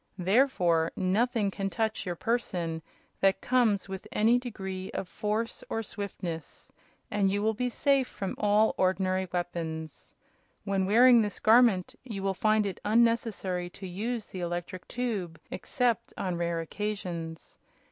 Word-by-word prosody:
Therefore 180 -5 +3
nothing 205 +2 +1
can 195 0 -2
touch 220 -1 -2
your 175 - -2
person 175 -7 -1 0.4
that 195 0 +3
comes 235 -7 +2
with 190 -1 -7
any 230 +3 +4
degree 190 -6 -5
of 190 - -3
force 215 +4 -2
or 225 - -1
swiftness, 185 -6 -6 0.4
and 205 -2 +2
you 205 +1 0
will 220 +1 +2
be 250 +3 -1
safe 275 +1 +2
from 195 - -4
all 210 +1 +4
ordinary 185 0 +1
weapons. 165 -3 -4 0.5
When 195 -1 0
wearing 240 +3 +7
this 210 -1 -3
Garment 220 -5 +5
you 215 -7 -6
will 195 0 +1
find 215 +2 +2
it 195 -3 -4
unnecessary 215 -5 +1
to 190 +2 -10
use 215 +5 -3
the 185 - -8
electric 175 +1 -4
tube 205 -9 -3
except 240 -1 -1
on 185 -2 -1
rare 170 -1 -1
occasions. 170 -3 -5
195 Hz, 140 wpm, -29 LUFS, 180-225 Hz, 0.5 s, wearing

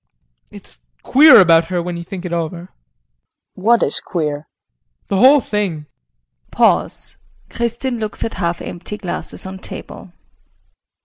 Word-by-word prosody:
JEAN. - - -12
It's - - -18 0.2
queer 295 -1 +7
about 165 -3 +5
her 175 +1 -2
when 175 0 -4
you 170 - -6
think 180 +1 -8
it 175 - -4
over. 170 0 -3
KRISTIN. 175 +2 -13 0.9
What 235 +1 +4
is 140 - +1
queer? 155 -4 -3
JEAN. - - -26
The 195 - 0
whole 270 +7 +6
thing. 195 -9 -3 0.6
[Pause. - - 0 0.3
Kristin 235 +1 -2
looks 215 -2 -4
at 225 - -4
half 170 -2 -3
empty 175 +4 -7
glasses 190 -2 -6
on 190 0 -8
table. - - -9
180 Hz, 145 wpm, -18 LUFS, 170-220 Hz, 0.9 s, queer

